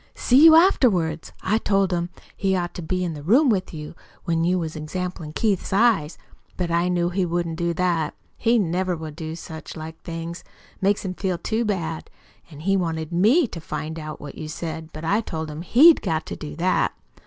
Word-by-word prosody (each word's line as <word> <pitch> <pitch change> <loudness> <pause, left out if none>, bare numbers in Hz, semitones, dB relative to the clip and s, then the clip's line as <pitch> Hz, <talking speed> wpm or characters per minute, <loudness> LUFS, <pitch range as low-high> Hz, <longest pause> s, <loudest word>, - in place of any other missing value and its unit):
"See 260 +4 +4
you 320 -1 +10
afterwards. 190 - +3
I 210 +4 +2
told 195 -3 +1
him 175 0 -1 0.3
he'd 190 -1 +1
ought 175 -1 -2
to - - -6
be 180 +3 -2
in 170 -2 -2
the 150 - -8
room 250 - +4
with 195 -5 0
you, 150 -1 -7 0.3
when 165 -1 0
you 180 +2 +2
was 160 -2 -3
examplin' 165 +1 -5
Keith's 205 -5 0
eyes. 195 -7 +3 0.4
But 175 -2 -1
I 170 +1 +2
knew 175 -1 +1
he 185 +1 0
wouldn't 170 -1 -2
do 170 0 0
that. 170 -3 0 0.2
He 235 +1 +2
never 185 -2 0
will 160 -1 -6
do 160 +1 -6
such 160 -1 -9
like 160 +1 -8
things 165 0 -6 0.4
makes 200 +1 +1
him 185 - -2
feel 185 -1 -2
too 220 +6 -1
bad. 165 -6 -3 0.4
An' 150 -2 -11
he 195 +4 +2
wanted 160 -4 -2
ME 220 - +4
to 165 - -7
find 160 +1 -5
out 155 -1 -7
what 145 - -8
you 155 - -5
said. 160 0 -5
But 155 +1 -7
I 205 +7 +2
told 160 -7 -5
him 150 +2 -6
HE'D 290 - +6
got 160 0 -1
to - - -5
do 150 - -8
that. 180 +3 +1
175 Hz, 205 wpm, -23 LUFS, 160-195 Hz, 0.4 s, you